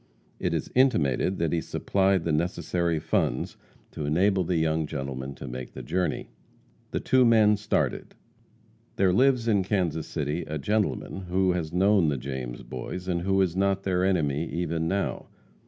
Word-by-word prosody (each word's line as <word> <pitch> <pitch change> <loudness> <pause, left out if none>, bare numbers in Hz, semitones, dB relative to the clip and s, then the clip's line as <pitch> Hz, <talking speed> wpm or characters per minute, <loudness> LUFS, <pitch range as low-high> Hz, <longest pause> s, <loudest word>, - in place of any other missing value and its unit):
It - - 0
is - - -3
intimated 95 - +2
that 85 -1 0
he 85 - +1
supplied 95 0 +1
the 85 - -1
necessary 85 +1 0
funds 80 +1 -1 0.4
to 75 - -5
enable 95 +5 +2
the 90 +1 -1
young 80 -1 +1
gentleman 70 -2 -5
to - - -8
make 65 0 -7
the - - -7
journey. 90 +2 -2 0.6
The - - -2
two 130 -1 +3
men 110 -3 +5
started. 105 - -1 0.8
There 95 -2 +3
lives 125 +1 +3
in 100 -4 +3
Kansas 85 -6 -1
City 75 +2 -2
a 75 - -3
gentleman 95 - -1
who 95 +1 +2
has 85 -3 -2
known 95 -2 +3
the 70 - -1
James 65 -2 -5
Boys, 90 +8 -6
and 85 -2 0
who 95 +2 +1
is 90 -2 -2
not 95 0 +1
their 90 -2 +1
enemy, 80 -5 +1
even 85 -1 -2
now. 100 +3 -2
85 Hz, 165 wpm, -27 LUFS, 75-95 Hz, 0.8 s, men